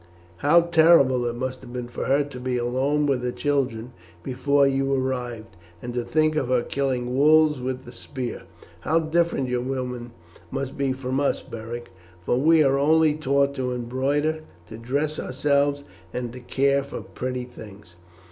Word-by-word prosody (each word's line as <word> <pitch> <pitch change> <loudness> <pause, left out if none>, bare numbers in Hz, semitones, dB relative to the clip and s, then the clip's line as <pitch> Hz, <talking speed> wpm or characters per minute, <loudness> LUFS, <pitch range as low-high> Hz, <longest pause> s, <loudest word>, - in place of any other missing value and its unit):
How 150 - +5
terrible 160 -7 +4
it 120 - -3
must 130 +1 -4
have 120 - -11
been 125 -1 -5
for 120 - -5
her 140 +2 +3
to 140 -3 -9
be 125 0 -2
alone 130 +5 0
with 135 -3 +1
her 125 - -1
children 125 -5 -1 0.3
before 140 +2 +2
you 135 0 +1
arrived, 125 -5 -3 0.2
and 120 +6 -6
to 120 0 -1
think 155 +4 +1
of 150 - 0
her 125 -1 +2
killing 125 -3 -2
wolves 150 0 +4
with 130 0 -3
the 120 - -11
spear. 125 0 -6 0.3
How 160 - +1
different 165 -3 +1
your 125 -1 -1
women 125 -2 -4 0.4
must 135 +6 -4
be 140 -1 0
from 130 0 -2
us, 140 - 0
Beric, 115 +1 -7 0.3
for 85 +8 0
we 160 +2 +5
are 135 0 +2
only 155 +1 +4
taught 140 -2 +1
to 130 -2 -2
embroider, 135 +6 -1 0.3
to 110 - -8
dress 145 +6 -2
ourselves, 140 +1 +1 0.3
and 120 +1 -4
to 125 - -8
care 140 +3 +1
for 140 -3 -7
pretty 125 +6 -5
things. 105 -7 -13
130 Hz, 170 wpm, -24 LUFS, 125-145 Hz, 0.4 s, How